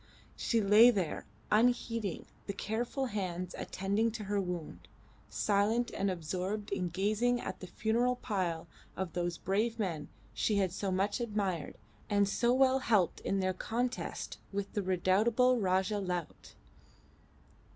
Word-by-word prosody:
She 230 -2 +1
lay 210 +4 +8
there 190 -9 -1 0.2
unheeding 230 -3 +1 0.2
the 200 - -2
careful 235 +7 -2
hands 185 -6 -3
attending 200 +4 0
to 220 -1 -5
her 205 0 0
wound, 165 - -5 0.4
silent 215 +4 +1
and 195 - 0
absorbed 185 +4 -3
in 185 -3 -1
gazing 215 +7 +1
at - - -5
the 185 - -8
funeral 235 +6 +1
pile 185 -9 -2 0.3
of 190 -3 -3
those 175 -1 -1
brave 220 +5 0
men 170 -9 -2 0.2
she 205 - +1
had 190 -3 +2
so 195 0 -2
much 195 +5 0
admired 200 -9 -2 0.3
and 205 -1 +3
so 235 +4 +2
well 260 +1 +4
helped 210 -9 +2
in 195 0 -1
their 185 0 +1
contest 245 +6 -3
with 200 0 -3
the 205 - 0
redoubtable 215 +7 +3
"Rajah 190 +1 +1
Laut." 180 -4 -4
200 Hz, 140 wpm, -32 LUFS, 185-230 Hz, 0.4 s, lay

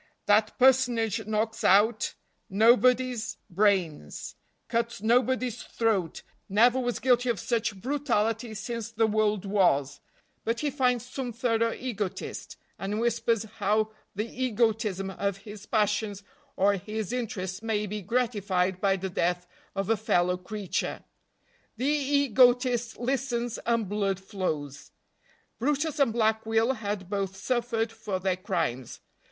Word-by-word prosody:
That 210 +1 +3
personage 245 -4 +3
knocks 220 +1 -1
out 210 +4 +4 0.3
nobody's 235 +1 +3
brains, 175 - 0 0.3
cuts 230 -2 -2
nobody's 245 +1 +2
throat, 210 -8 -1 0.3
never 235 +6 +4
was 245 -2 -1
guilty 245 -1 +2
of 230 -5 0
such 220 -3 -1
brutality 230 -3 -1
since 225 +1 -4
the 225 0 +1
world 215 -2 +1
was, 145 -9 +2 0.4
but 230 +1 -1
he 295 -1 0
finds 250 -3 +1
some 255 -1 -5
thorough 230 -1 +1
egotist, 210 -7 -5 0.2
and 205 +2 -2
whispers 230 -1 +1
how 215 0 0 0.2
the 210 +3 -1
egotism 220 -5 0
of 200 0 -2
his 205 0 -11
passions 210 -2 0 0.3
or 200 +1 +3
his 215 +3 -4
interest 205 -6 -3
may 220 -2 -1
be 210 +1 -4
gratified 200 -4 0
by 195 -1 +3
the 190 0 -4
death 175 0 0 0.3
of 195 -1 -1
a 225 - +3
fellow 180 -4 +2
creature. 190 +1 -4 0.7
The 255 - -2
egotist 255 -4 +3
listens, 245 -2 -1
and 230 -3 +1
blood 200 -1 -1
flows. 160 -8 -4 0.7
brutus 295 +4 0
and 275 -5 +4
Black 220 -1 +1
Will 225 +3 +2
had 205 -5 -4
both 195 -1 -2
suffered 235 0 -1
for 220 -4 -4
their 185 0 0
crimes. 165 - -2
220 Hz, 125 wpm, -28 LUFS, 195-240 Hz, 0.7 s, out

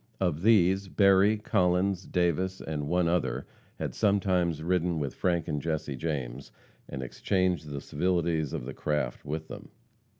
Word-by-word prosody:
Of 85 -5 0
these, 95 -2 +4
Berry, 100 +2 +4
Collins, 90 -1 +1
Davis, 90 +2 0
and 75 -2 -4
one 90 +1 +2
other, 85 +1 0 0.3
had - - -3
sometimes 90 -6 +1
ridden 90 -1 +1
with 70 -4 -2
Frank 85 -3 0
and 75 -3 -2
Jesse 80 -3 -2
James, 70 -4 -4 0.4
and 65 - -5
exchanged 90 +3 -1
the 70 -1 -5
civilities 85 -2 0
of - - -4
the 65 - -6
craft 75 -5 -2
with 80 +2 -4
them. - - -9
85 Hz, 145 wpm, -28 LUFS, 75-95 Hz, 0.4 s, these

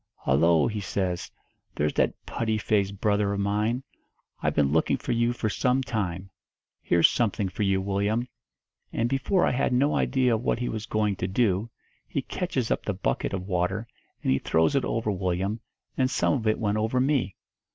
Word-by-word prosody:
'Hollo' 80 +4 +3
he 110 -2 -2
says, 95 -2 -2 0.5
'there's 75 0 0
that - - 0
putty 110 -1 -1
faced 100 -2 0
brother 100 -1 +1
of 100 - -2
mine. 105 +5 0 0.6
I've - - 0
been 70 -2 +3
looking 80 +1 +2
for - - -4
you 120 0 +2
for 120 -2 -2
some 125 +4 +1
time. 95 -6 -3 0.5
Here's 85 -1 +5
something 105 -4 0
for 95 - -6
you, 95 -2 +2
Willyum.' 100 +5 0 0.6
And 115 - 0
before 135 +9 +1
I - - +2
had 130 +1 +1
no 140 +4 +3
idea 130 -3 +2
of 110 - 0
what - - 0
he 120 +1 -2
was 110 +1 -4
going 105 -3 0
to 90 - -2
do, 100 +1 +1 0.4
he - - -2
catches - - -2
up - - 0
the - - -2
bucket - - -1
of 95 -1 -3
water 95 +4 -1 0.4
and - - +2
he 65 - +3
throws 80 - +2
it 135 - +2
over 115 -2 -1
Willyum, 95 +3 -1 0.4
and 130 -1 +2
some - - +1
of 120 -6 -1
it 110 - +3
went 105 -1 0
over 110 +4 +1
me. 130 -7 +1
105 Hz, 190 wpm, -26 LUFS, 95-120 Hz, 0.6 s, Here's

